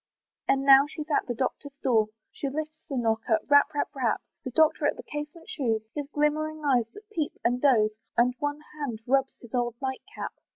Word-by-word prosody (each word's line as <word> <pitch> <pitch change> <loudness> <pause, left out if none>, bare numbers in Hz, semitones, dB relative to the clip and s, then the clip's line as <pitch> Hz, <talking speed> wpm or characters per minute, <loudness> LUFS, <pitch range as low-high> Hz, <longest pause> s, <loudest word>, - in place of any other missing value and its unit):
And 270 0 +3
now 275 +1 +8
she's 305 +1 -7
at - - +2
the 240 - -2
doctor's 275 +3 -3
door, 225 -4 +3 0.2
She 280 - -3
lifts 310 +2 -5
the 275 - -2
knocker, 225 -1 +2
rap, 285 +1 +6
rap, 290 - +1
rap, 255 -5 0 0.2
The - - -3
doctor 315 +2 +3
at - - 0
the - - -8
casement 295 +4 -7
shews, 245 - -1
His 290 -2 -4
glimmering 305 +1 0
eyes 250 -5 +3
that 415 +1 -12
peep 315 -8 -1
and 245 +1 +2
doze; 225 -7 +4 0.3
And 245 +1 +4
one 290 +1 -2
hand 275 -7 -4
rubs 270 +1 +2
his 240 - -14
old 240 -2 0
night 265 -1 -3
cap. - - -5
275 Hz, 200 wpm, -27 LUFS, 245-300 Hz, 0.3 s, now